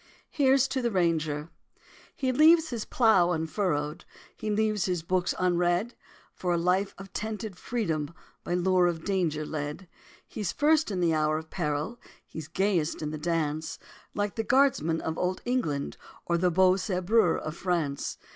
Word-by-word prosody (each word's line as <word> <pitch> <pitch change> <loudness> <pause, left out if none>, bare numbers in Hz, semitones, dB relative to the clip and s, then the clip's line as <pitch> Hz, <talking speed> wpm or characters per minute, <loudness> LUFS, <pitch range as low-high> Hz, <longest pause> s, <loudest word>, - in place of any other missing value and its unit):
HERE'S 270 -2 +3
TO 265 0 -2
THE 240 - +1
RANGER! 160 -5 0 0.6
He 260 -2 0
leaves 315 +4 +5
unplowed 200 -7 +3
his 160 - -6
furrow, 150 -6 -1 0.4
He 215 - -5
leaves 215 -2 +1
his 180 -3 -1
books 180 +1 0
unread 180 +4 +1 0.4
For 180 -1 -1
a - - +1
life 180 +3 +1
of 195 -1 -11
tented 215 -2 -4
freedom 165 -9 -2 0.3
By 175 - -1
lure 180 0 +3
of 165 -2 -2
danger 170 -6 0
led. 150 +4 -5 0.4
He's 205 -5 -3
first 310 0 +3
in 190 -3 -2
the 170 -2 +3
hour 155 0 +1
of 160 0 -8
peril, 155 +6 -2 0.3
He's 160 -2 -8
gayest 170 -3 0
in 150 - -3
the 155 - -5
dance, 160 -1 -2 0.4
Like 205 -1 -1
the 225 - 0
guardsman 220 - +2
of 160 0 -3
old 185 +1 -1
England 230 - -1 0.3
Or 170 - +1
the 180 +1 +2
beau 185 +2 +4
sabreur 185 0 +2
of 155 0 -5
France. 170 -6 -2
180 Hz, 160 wpm, -28 LUFS, 160-215 Hz, 0.6 s, leaves